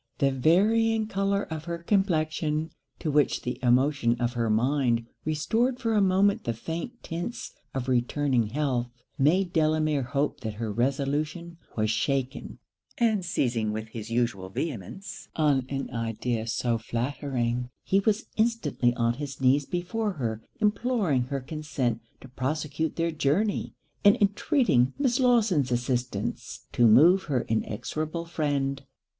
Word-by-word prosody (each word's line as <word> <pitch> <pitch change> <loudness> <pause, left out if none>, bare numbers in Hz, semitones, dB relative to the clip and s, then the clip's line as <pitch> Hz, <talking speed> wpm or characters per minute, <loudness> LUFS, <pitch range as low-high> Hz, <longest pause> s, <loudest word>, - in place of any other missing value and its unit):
The 140 -2 +2
varying 215 - +3
colour 200 -1 0
of 160 -1 -6
her 170 -1 -3
complexion, 160 -4 0 0.3
to 155 - -2
which 145 -1 +2
the 125 - -3
emotions 125 -1 +2
of 120 0 0
her 115 -2 0
mind 120 +1 +2 0.2
restored 225 - 0
for 230 -2 0
a 210 - +4
moment 195 +1 +3
the 115 - -2
faint 165 - -6
tints 175 +9 -5 0.2
of 130 -1 -2
returning 125 -1 +1
health, 125 -1 -1 0.3
made 175 +6 +3
Delamere 155 -2 +2
hope 140 +3 -1
that 110 -5 -5
her 110 -1 -3
resolution 145 - -1 0.2
was 110 0 +1
shaken; 130 +3 -2 0.4
and 220 -5 +2
seizing 120 -10 0
with 110 +1 -5
his 110 -1 -7
usual 115 -6 -1
vehemence 140 - -5
on 140 -5 +2
an 135 -1 -3
idea 115 -1 -2
so 115 0 0
flattering, 125 0 -2
he 195 - +2
was 210 +2 +1
instantly 215 - +1
on 115 0 +1
his 140 +1 -6
knees 135 +2 +3
before 200 +4 -2
her 115 -7 -3 0.2
imploring 210 - +1
her 135 +1 -3
consent 135 -5 -2 0.2
to - - -11
prosecute 145 +4 -2
their 165 0 0
journey, 160 +8 0 0.3
and 205 0 +7
intreating 205 - +2
Miss 260 -3 +1
Lawson's 215 - +3
assistance, 125 +1 -2
to 120 - +4
move 165 - +6
her 135 -6 0
inexorable 155 +9 -3
friend. 145 -4 -1
145 Hz, 140 wpm, -27 LUFS, 120-175 Hz, 0.4 s, and